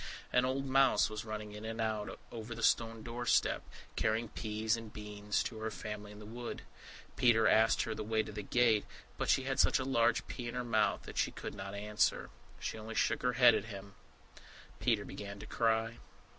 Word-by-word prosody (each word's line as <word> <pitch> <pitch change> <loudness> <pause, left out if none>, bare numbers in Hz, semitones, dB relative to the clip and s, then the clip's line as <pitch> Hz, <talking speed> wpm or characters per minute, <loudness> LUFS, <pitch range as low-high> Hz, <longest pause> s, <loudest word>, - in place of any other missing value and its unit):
An 125 0 +4
old 135 +1 -1
mouse 135 -5 +4
was 110 +1 -5
running 110 -1 -5
in 105 +1 -8
and 110 +1 -5
out 110 -2 -2
over 115 0 -6
the - - -6
stone 115 -1 +2
doorstep, 120 +1 +1 0.3
carrying 110 +1 0
peas 110 +1 -1
and 115 -2 -8
beans 105 -1 -2
to 110 - -5
her 110 0 -2
family 105 -2 -6
in 105 - -11
the 105 - -10
wood. 120 +2 -6 0.5
Peter 115 -2 +5
asked 110 +1 +4
her - - -3
the - - -4
way 110 0 +1
to - - -8
the 105 0 -5
gate, 115 0 +3 0.4
but - - -1
she 135 - +4
had 135 0 -2
such - - +5
a 130 - -1
large 120 -3 +2
pea 120 - -6
in 120 - -5
her 125 - -1
mouth 110 -3 +1
that - - -5
she - - +2
could - - -7
not 100 +1 -6
answer. 105 +1 0 0.3
She 110 - -4
only 110 +1 -7
shook - - +1
her 125 0 +1
head 125 -1 +7
at - - 0
him. 100 -2 -9 0.9
Peter - - +1
began 100 0 -7
to - - -9
cry. 115 0 0
110 Hz, 205 wpm, -34 LUFS, 105-120 Hz, 0.9 s, head